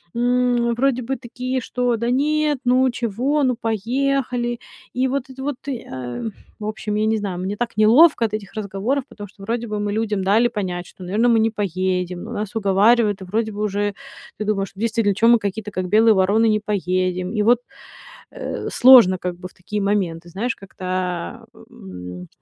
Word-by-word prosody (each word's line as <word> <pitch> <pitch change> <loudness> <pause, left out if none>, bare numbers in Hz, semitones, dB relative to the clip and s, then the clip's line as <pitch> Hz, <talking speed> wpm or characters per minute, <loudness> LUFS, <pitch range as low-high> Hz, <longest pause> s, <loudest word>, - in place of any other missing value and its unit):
м, 245 0 +2
вроде 255 0 +1
бы 265 +3 -2
такие, 255 +1 -4
что: 245 0 -1
"Да 235 +2 -1
нет, 300 +2 +1
ну 255 +1 +4
чего, 250 +6 -1
ну 250 -2 +2
поехали". 240 +2 -1 0.3
И 255 +1 +1
вот 270 0 -2
это 265 0 -8
вот, 290 -2 -2
и 255 -4 -4
а, 125 -2 -5
м, 225 - -4 0.3
в 210 - -6
общем, 215 0 -3
я 215 +1 +1
не 220 0 +2
знаю, 195 -4 -4
мне 190 +3 -3
так 235 -1 -3
неловко 235 +5 +6
от 215 - -4
этих 210 -2 -5
разговоров, 215 +6 -2
потому 205 -6 -10
что 195 0 -16
вроде 235 +2 -2
бы 210 -1 -3
мы 205 0 -2
людям 215 -3 -1
дали 215 +5 +4
понять, 180 -5 -4
что, 185 - -13
наверно, 210 +7 +1
мы 230 -1 +4
не 225 +1 +3
поедем, 185 -3 -2
но - - -8
нас 210 +1 -4
уговаривают, 210 +1 +3
и - - -7
вроде 220 +4 -1
бы 205 0 -6
уже 205 0 -1 0.4
ты 215 - -4
думаешь: 200 -2 -1
"Действительно, 215 -1 0
чё 220 +3 +3
мы 235 0 +7
какие-то 210 +1 -4
как 185 -2 -3
белые 220 +3 +5
вороны 200 +4 +3
не 215 - +2
поедем". 185 -3 -1
И 215 - 0
вот, 240 +2 +4 0.7
э, - - -5
сложно 240 -8 +7
как 180 0 -4
бы 185 - -7
в - - -20
такие 205 +3 -5
моменты, 180 -4 -1
знаешь, 220 +8 -2
как-то, 190 -1 -11
а, 180 - -3 0.2
м, 90 -1 -9
215 Hz, 195 wpm, -21 LUFS, 195-240 Hz, 0.7 s, мы